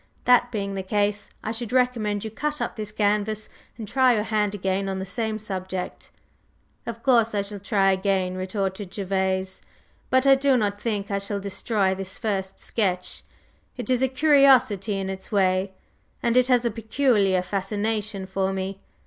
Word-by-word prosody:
That 245 0 +5
being 200 -3 -3
the 195 - -3
case, 205 +1 -1
I 220 - -2
should 230 -1 -5
recommend 235 -5 +1
you 220 - -5
to - - -24
cut 300 0 -2
up - - -3
this 215 -2 -5
canvas 210 0 0 0.3
and 220 -3 -6
try 255 +2 +4
your 210 - 0
hand 210 -2 0
again 195 0 -1
on 190 - -2
the 190 - -4
same 220 +2 -2
subject." 190 -3 -5 0.8
"Of 230 0 -6
course, 230 -5 +3
I 200 - +1
shall 200 0 -8
try 195 0 +2
again," 190 -1 0
retorted 190 +1 -3
Gervase. 190 -1 -1 0.5
"But 260 +1 +3
I 275 - +8
do 270 -1 +3
not 205 -2 -1
think 210 -3 -2
I 200 - 0
shall 200 +1 -3
destroy 200 0 0
this 190 0 -7
first 195 -4 -2
sketch. 185 -5 -2 0.6
It - - -3
is 250 -1 +2
a 265 - +4
curiosity 260 -7 +4
in 195 -1 -3
its 190 +2 -6
way; 190 -1 +2 0.5
and 235 0 +2
it 255 0 +5
has 245 -2 +3
a 235 - +1
peculiar 215 -4 +2
fascination 205 +1 -2
for 190 0 -1
me. 190 0 -4
205 Hz, 175 wpm, -25 LUFS, 195-230 Hz, 0.8 s, I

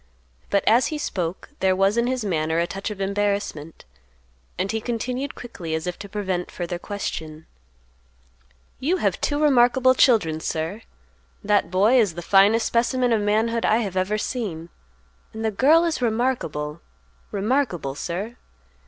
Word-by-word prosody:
But, 200 - +2
as 235 +4 +5
he 310 - -3
spoke, 180 - -4
there 190 0 +2
was 195 +2 +2
in 235 +1 +1
his 255 -3 -1
manner 160 -3 0
a 170 - +2
touch 195 +4 -5
of 210 -2 -7
embarrassment, 200 -5 -2 0.7
and 190 +2 -1
he 220 0 -2
continued 250 +4 -3
quickly 175 -9 -6
as 160 - -3
if 180 -1 -4
to 200 - -8
prevent 190 -3 -3
further 175 0 -5
question, 160 -6 -5 1.3
"You 335 +8 +1
have - - -1
two 290 0 0
remarkable 255 -3 +4
children, 210 - +3
sir; 160 +7 -3 0.6
that 205 -4 +2
boy 205 +8 +4
is 200 -8 +2
the 175 - -6
finest 205 +5 +4
specimen 240 +1 +1
of 220 - +2
manhood 225 +3 +1
I 220 - +3
have 190 -2 -6
ever 190 +3 0
seen, 195 -9 -4 0.6
and 220 0 -4
the 220 - +1
girl 305 +10 +4
is 325 -6 -1
remarkable—remarkable, 165 - -2
sir. 190 +10 -5
205 Hz, 150 wpm, -23 LUFS, 175-240 Hz, 1.3 s, as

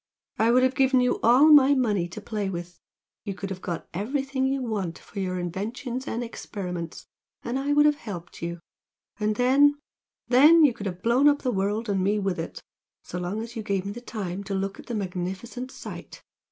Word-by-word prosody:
I 225 +1 +4
would 250 +2 +5
have 260 0 +3
given 265 -1 +3
you 250 0 +1
all 245 +6 +6
my 285 -1 +7
money 210 -9 +1
to 175 - -8
play 210 -2 -3
with, 175 -1 -7 0.4
you 200 -3 -4
could 195 0 -6
have 185 -1 -6
got 170 -2 -4
everything 265 - -1
you 270 0 -1
want 200 -8 -3
for 200 - -9
your 185 -1 -2
inventions 225 +9 -4
and 235 +2 -2
experiments, 180 -7 -6 0.4
and 245 +3 -2
I 285 +2 0
would 295 0 +5
have 295 -1 +4
helped 180 - -8
you, 170 0 -4 0.6
and 210 0 0
then 275 +4 +4 0.5
then 300 +7 +7
you 270 - +3
could 205 -2 -5
have 180 -1 -6
blown 245 +5 +4
up 290 -1 +3
the 255 - +1
world 205 +3 -1
and 195 -2 0
me 205 +2 +2
with 195 -4 -1
it, 165 - -6 0.4
so 180 - -6
long 180 +5 -3
as 235 +1 -9
you 225 - -3
gave 200 -2 -2
me 200 - -4
time 205 -5 -5
to 195 0 -3
look 195 +1 -3
at - - -12
the 240 - -3
magnificent 190 +6 -4
sight! - - -9
215 Hz, 205 wpm, -26 LUFS, 190-255 Hz, 0.6 s, my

